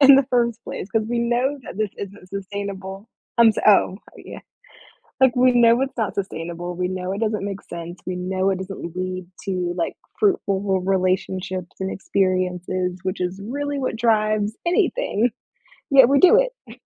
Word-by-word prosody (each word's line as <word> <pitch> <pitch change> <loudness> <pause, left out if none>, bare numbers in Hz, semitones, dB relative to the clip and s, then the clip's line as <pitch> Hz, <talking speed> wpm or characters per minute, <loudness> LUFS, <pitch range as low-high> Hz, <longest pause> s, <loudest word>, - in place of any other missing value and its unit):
in 275 -1 +9
the 275 - +4
first 235 -2 +1
place? 195 - -6
'Cause 220 0 0
we 240 0 -1
know 245 +4 +1
that 215 - -9
this 215 -2 0
isn't 200 -2 -8
sustainable. 195 +1 -6 0.3
I'm, 230 -1 +8
s 215 - +1
oh, 195 -2 +5 0.2
yeah. - - -10 0.8
Like, 260 -2 +5
we 255 0 +5
know 240 0 +5
it's 270 -1 -2
not 215 -4 -1
sustainable. 175 -2 -4
We 180 0 -1
know 185 0 -3
it 200 - -4
doesn't 215 -2 -1
make 200 -1 -5
sense. 170 +1 -8
We 180 0 -3
know 185 +1 0
it 190 - -1
doesn't 190 -3 -6
lead 185 0 -4 0.2
to, 180 -3 -1
like, 170 - -2 0.2
fruitful 365 - +2
re 190 -2 +1 0.2
relationships 185 0 -2
and 190 0 -2
experiences, 185 -1 -1
which 185 -1 -3
is 180 +2 -3
really 285 +5 -3
what 255 -4 -2
drives 215 -2 +1
anything. 345 - +1 0.6
Yet 270 -3 +8
we 280 0 +4
do 370 - +7
it. - - -4
200 Hz, 175 wpm, -22 LUFS, 185-235 Hz, 0.8 s, in